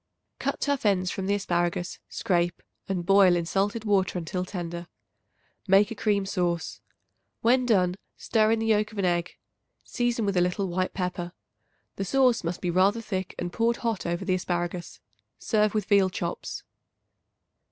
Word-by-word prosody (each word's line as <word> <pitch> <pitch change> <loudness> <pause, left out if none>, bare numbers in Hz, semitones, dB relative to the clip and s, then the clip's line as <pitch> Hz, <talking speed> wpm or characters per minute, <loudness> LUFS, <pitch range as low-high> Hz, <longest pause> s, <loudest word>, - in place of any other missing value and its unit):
Cut - - -2
tough 285 -2 0
ends 185 -4 +2
from 190 -1 -4
the 200 - +2
asparagus; 175 -2 -1
scrape 175 -2 0 0.3
and 180 -3 -2
boil 195 -1 +6
in 170 -1 -1
salted 205 +5 -1
water 195 -3 +2
until 180 +2 -3
tender. 175 -2 -5 0.8
Make 195 +3 +5
a - - -4
cream 205 -2 +1
sauce. 175 -4 -2 0.6
When 250 +2 +3
done, 185 -6 +3 0.2
stir 215 -1 +2
in 225 - +3
the 225 - -2
yolk 215 -1 +2
of 215 - -12
an 195 - +1
egg; 175 -1 -1 0.5
season 240 -2 -1
with 200 -1 0
a 180 - +4
little 180 +2 0
white 185 +1 -2
pepper. 180 -2 -3 0.6
The 195 - -2
sauce 255 0 +3
must 170 +1 -3
be 175 - 0
rather 195 +5 +3
thick 190 -4 -4
and 175 0 -4
poured 235 +1 +1
hot 225 -6 -1
over 175 +2 -2
the 185 - +1
asparagus. 175 -1 -3 0.4
Serve 215 -1 +1
with 210 -3 0
veal 200 -2 +4
chops. 175 -1 -5
190 Hz, 165 wpm, -27 LUFS, 175-215 Hz, 0.8 s, boil